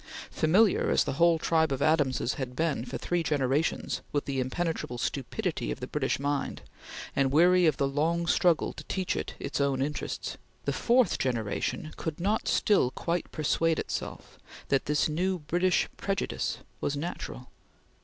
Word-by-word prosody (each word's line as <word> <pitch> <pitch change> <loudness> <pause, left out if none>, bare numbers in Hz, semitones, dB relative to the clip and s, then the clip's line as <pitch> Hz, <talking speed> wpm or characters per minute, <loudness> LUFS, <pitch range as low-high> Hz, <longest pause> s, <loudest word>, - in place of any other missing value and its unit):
Familiar 190 +7 +3
as - - +4
the - - -2
whole 170 -1 +6
tribe 160 -1 +2
of 135 - -1
Adamses 145 -6 +2
had 125 -2 -5
been 150 -5 0
for - - -5
three 175 -1 -1
generations 145 -1 0
with 145 - -1
the 135 -1 -2
impenetrable 130 -1 -2
stupidity 155 - -2
of - - -3
the 125 - -4
British 135 0 -1
mind, 145 0 -2 0.5
and 135 -1 +2
weary 175 +3 +5
of 155 - +2
the 140 - +1
long 160 +5 0
struggle 170 -1 +2
to - - -9
teach 190 -2 -1
it - - -4
its 140 0 -3
own 140 -2 +1
interests, 145 +3 -3 0.3
the - - 0
fourth 245 0 +3
generation 120 +4 -2
could 160 -2 -3 0.3
still 205 -9 +3
not 125 - -5
quite 170 0 -2
persuade 160 +1 +1
itself - - -5 0.3
that 135 - +2
this 150 +1 +2
new 180 +5 0
British 175 +4 +1
prejudice 195 -1 -2 0.2
was 145 - -1
natural. 145 -5 -5
155 Hz, 160 wpm, -29 LUFS, 135-170 Hz, 0.5 s, whole